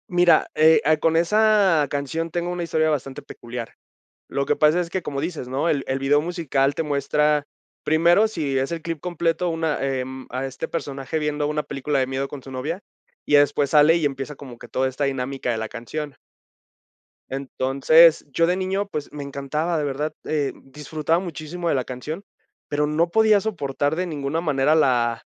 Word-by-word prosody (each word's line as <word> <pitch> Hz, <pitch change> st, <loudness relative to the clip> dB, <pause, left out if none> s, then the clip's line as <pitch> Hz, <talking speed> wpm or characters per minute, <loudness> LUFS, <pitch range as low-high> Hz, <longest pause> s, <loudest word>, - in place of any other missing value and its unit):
Mira, 175 Hz, -1 st, +4 dB
eh 160 Hz, +1 st, +6 dB
ah, 155 Hz, +1 st, +4 dB
con 160 Hz, +1 st, +1 dB
esa 195 Hz, -3 st, +4 dB
canción 155 Hz, +4 st, -3 dB
tengo 175 Hz, +1 st, -2 dB
una 180 Hz, -1 st, -3 dB
historia 155 Hz, -1 st, +1 dB
bastante 135 Hz, -3 st, -3 dB
peculiar. 120 Hz, -1 st, -8 dB, 0.5 s
Lo 140 Hz, -, -1 dB
que -, -, +1 dB
pasa 155 Hz, +3 st, +4 dB
es 175 Hz, -1 st, -2 dB
que, 185 Hz, +1 st, -2 dB
como 140 Hz, -2 st, -4 dB
dices, 160 Hz, -5 st, -4 dB
¿no? 135 Hz, +5 st, -1 dB
El 140 Hz, -4 st, +1 dB
el 135 Hz, +1 st, -1 dB
video 145 Hz, +2 st, +3 dB
musical 150 Hz, -5 st, 0 dB
te -, -, -1 dB
muestra 150 Hz, 0 st, +1 dB, 0.4 s
primero, 170 Hz, +7 st, +4 dB
si 155 Hz, -10 st, -2 dB
es 135 Hz, +3 st, -1 dB
el 165 Hz, -1 st, -3 dB
clip 165 Hz, -1 st, -4 dB
completo, 175 Hz, 0 st, -1 dB
una, 160 Hz, -2 st, -1 dB
em, 130 Hz, -1 st, -3 dB
a 130 Hz, +2 st, -3 dB
este 135 Hz, -1 st, -5 dB
personaje 140 Hz, -1 st, -4 dB
viendo 150 Hz, -1 st, -1 dB
una 150 Hz, 0 st, -1 dB
película 140 Hz, 0 st, -2 dB
de 130 Hz, -, +1 dB
miedo 135 Hz, +1 st, -2 dB
con 145 Hz, -, -8 dB
su 135 Hz, -, -11 dB
novia, 150 Hz, +9 st, -4 dB, 0.4 s
y -, -, -2 dB
ya 145 Hz, -, +8 dB
después 145 Hz, 0 st, +2 dB
sale 150 Hz, +2 st, +6 dB
y 165 Hz, -, -1 dB
empieza 135 Hz, +1 st, -3 dB
como 130 Hz, -4 st, -11 dB
que -, -, -12 dB
toda 130 Hz, +1 st, 0 dB
esta 130 Hz, +2 st, -3 dB
dinámica 135 Hz, -1 st, -2 dB
de 115 Hz, -, -1 dB
la 110 Hz, 0 st, -3 dB
canción. 145 Hz, +4 st, -6 dB, 1.1 s
Entonces, 135 Hz, +4 st, +4 dB
yo 165 Hz, +5 st, +2 dB
de 180 Hz, +1 st, +1 dB
niño, 190 Hz, +2 st, -1 dB
pues, 150 Hz, -7 st, -5 dB
me 145 Hz, -1 st, -5 dB
encantaba, 140 Hz, +4 st, -2 dB
de 150 Hz, -, -1 dB
verdad, 145 Hz, +2 st, -2 dB
eh, 150 Hz, -3 st, 0 dB
disfrutaba 150 Hz, +4 st, -2 dB
muchísimo 170 Hz, -1 st, -5 dB
de -, -, +2 dB
la 130 Hz, -, 0 dB
canción, 150 Hz, +9 st, -6 dB, 0.4 s
pero, 150 Hz, 0 st, 0 dB
no 160 Hz, +3 st, +1 dB
podía 215 Hz, +1 st, +4 dB
soportar 145 Hz, -8 st, -1 dB
de 180 Hz, +2 st, -1 dB
ninguna 150 Hz, 0 st, -2 dB
manera 150 Hz, -2 st, +2 dB
la 120 Hz, -6 st, +2 dB
150 Hz, 190 wpm, -23 LUFS, 135-165 Hz, 1.1 s, ya